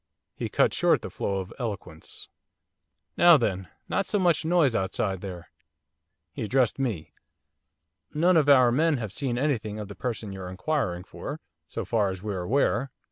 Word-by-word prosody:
He - - -4
cut - - +2
short - - +2
the - - -6
flow 100 - -2
of 95 - -9
eloquence. 100 -9 -6 0.9
'Now 175 -2 +8
then, 95 -7 -1 0.2
not 195 - -1
so 210 - 0
much 175 -5 +2
noise 160 -7 +3
outside 95 0 -1
there!' 90 -4 -8 0.8
He - - -6
addressed 120 +3 +1
me. 85 - -3 1.0
'None 175 +4 +3
of 150 -3 +4
our 130 -4 +7
men 155 +3 +2
have 110 -5 -5
seen 130 -5 -2
anything 120 -7 -1
of 105 -2 -6
the 100 - -8
person 115 -4 -4
you're 95 -2 -6
inquiring 95 - -2
for, 145 +9 -7 0.3
so 115 +6 -5
far 105 0 +1
as 95 0 -6
we're 100 -4 -3
aware. 130 +4 +1
115 Hz, 165 wpm, -27 LUFS, 95-145 Hz, 1.0 s, Now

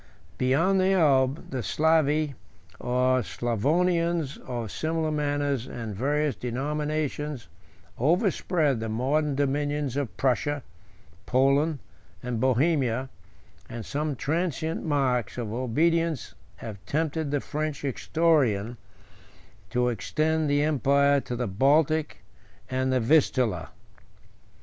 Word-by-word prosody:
Beyond 165 +10 +3
the 190 +1 +3
Elbe, 140 -5 +2
the 130 -2 -2
Slavi, 155 +1 +2 0.5
or 125 +1 +2
Sclavonians, 155 - 0
of 120 -5 -5
similar 160 0 -1
manners 145 -4 -1
and 115 -3 -6
various 145 +4 0
denominations, 150 +1 -3 0.5
overspread 160 - +1
the 110 0 -3
modern 140 +6 0
dominions 145 -1 -1
of 140 -5 -3
Prussia, 135 +2 0 0.6
Poland, 140 +4 +3 0.5
and 125 -2 -3
Bohemia, 130 -1 +1 0.6
and 115 -2 -6
some 150 0 -2
transient 160 +2 -2
marks 130 - 0
of 115 -3 -4
obedience 155 +4 0 0.2
have 105 -4 -9
tempted 160 0 -1
the 145 0 0
French 150 +1 -4
historian 135 -6 +1 0.9
to 125 0 +1
extend 155 +6 0
the 145 0 +2
empire 140 -1 +3
to 125 - -5
the 125 0 -2
Baltic 145 +9 +1 0.5
and 130 0 0
the 130 - +2
Vistula. 120 - +2
140 Hz, 105 wpm, -26 LUFS, 125-155 Hz, 0.9 s, Beyond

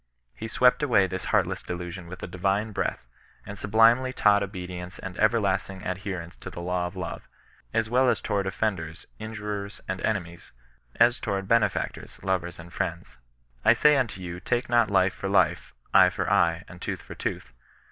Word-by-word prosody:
He 90 - -6
swept 125 +4 +4
away 120 -9 +4
this 95 0 -4
heartless 95 -2 +1
delusion 90 0 -6
with 90 +1 -9
a - - -3
divine 95 +4 0
breath, 100 - -2 0.4
and 100 - -7
sublimely 115 +5 +4
taught 105 -5 +4
obedient 90 -2 -6
and 95 -2 -7
everlasting 100 -3 +1
adherence 90 -2 -4
to - - -8
the 85 - -8
law 90 0 -1
of 90 - -10
love, 90 -2 -6 0.4
as 115 +5 +1
well 125 +2 +4
toward 100 -2 -2
offenders, 90 -3 -2
injurers 105 -2 -5
and 95 - -3
enemies, 85 -5 -3 0.4
as 120 +2 +4
toward 95 -1 -2
benefactors, 115 +1 0
lovers 90 -2 -1
and 85 0 -12
friends. - - -4 0.2
/ - - -37
sai/ 150 +5 +5
unto 115 -8 -1
yon 90 0 -6
take 120 +6 -1
not 120 -2 +4
life 95 -2 +3
for 95 - -4
life, 90 -8 +2 0.2
^H^for - - +5
eye, 85 0 +3
and 90 0 -12
tooth - - -4
for - - -9
tooth. 65 - -4
95 Hz, 165 wpm, -26 LUFS, 90-110 Hz, 0.4 s, sai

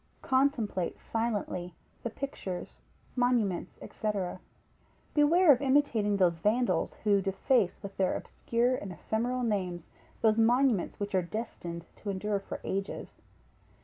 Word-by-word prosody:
Contemplate 260 -9 +1
silently 205 -6 -2 0.3
the 235 - -3
pictures, 210 -8 -6 0.3
monuments, 245 -7 +1
&c. 215 - -4 1.0
beware 320 +3 +6
of 260 -1 +4
imitating 260 -7 +3
those 175 -3 +3
vandals, 210 -1 +1
who 205 -2 +4
deface 195 +2 +1
with 200 0 -7
their 190 -1 +2
obscure 240 +2 0
and 200 -6 -6
ephemeral 240 +7 -1
names 185 -7 -2 0.3
those 220 0 +4
monuments 240 -3 +3
which 205 0 -3
are 185 - +3
destined 175 -3 -5
to 205 - -6
endure 200 +1 -1
for 195 - -7
ages. 195 +1 -4
215 Hz, 120 wpm, -30 LUFS, 190-245 Hz, 1.0 s, beware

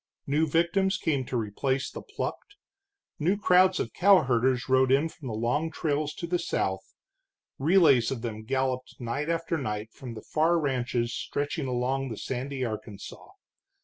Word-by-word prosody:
New 150 +3 +1
victims 175 +5 +2
came 140 -7 0
to 125 - -2
replace 130 +5 -1
the - - -7
plucked, 410 0 -6 0.6
new 180 +7 +2
crowds 185 -1 +4
of - - -3
cowherders 130 -10 +3
rode 130 0 +4
in 140 +4 +4
from 160 -4 -10
the 110 - -3
long 125 +9 0
trails 150 -2 -2
to - - -5
the 175 +1 0
south, 95 - -2 0.6
relays 145 -6 +5
of 125 -3 -4
them 110 -2 -4
galloped 130 +1 -2
night 135 +6 -3
after 165 -1 -1
night 105 -3 -4
from 125 -3 -8
the 110 - -9
far 165 +2 +2
ranches 125 -5 -1
stretching 145 +1 -3
along 130 +2 -1
the 110 - -6
sandy 130 +1 -3
Arkansas. 110 -2 -7
135 Hz, 155 wpm, -28 LUFS, 120-160 Hz, 0.6 s, relays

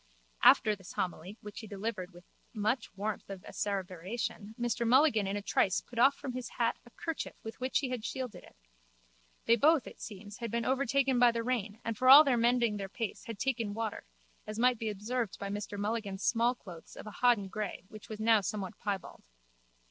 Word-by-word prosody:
After 215 -1 +6
this 190 -2 -12
homily 180 +3 -4
which 210 0 -8
he 220 - -9
delivered 200 -2 -4
with 175 0 -15 0.3
much 220 +4 0
warmth 210 +1 -3
of 195 -1 -7
asseveration 200 +2 -4
Mr 240 0 0
Mulligan 245 -5 +4
in 200 +1 -1
a 205 - -5
trice 190 -2 +2
put 240 - -8
off 270 +3 +6
from 260 - -6
his 250 -1 -5
hat 235 -2 +1
a - - -13
kerchief 325 +6 -5
with 225 +3 -8
which 255 +1 0
he 270 - -1
had 250 -3 -3
shielded 255 0 -5
it. - - -17 0.9
They 230 - +6
both, 295 +3 +4
it - - -11
seems, 205 0 -9
had 235 -1 -3
been 235 +1 -1
overtaken 270 0 +2
by 245 -1 +7
the 230 0 -2
rain 225 -4 -2
and 230 - -1
for 255 +4 +3
all 285 +3 +12
their 270 -4 +2
mending 235 -2 +2
their 195 -1 -5
pace 225 -1 -5
had 230 -4 -6
taken 230 -4 -1
water, 225 -1 -4 0.4
as 215 0 -5
might 245 0 +3
be 225 - -2
observed 215 +2 -3
by 200 - -5
Mr 205 0 -4
Mulligan's 205 -2 -2
smallclothes 230 -8 -1
of - - -9
a 215 - -7
hodden 240 -6 +4
grey 210 0 -4
which 215 0 -12
was 215 -1 -6
now 220 -1 +4
somewhat 195 -1 -4
piebald. 200 -3 -4
220 Hz, 200 wpm, -32 LUFS, 205-245 Hz, 0.9 s, all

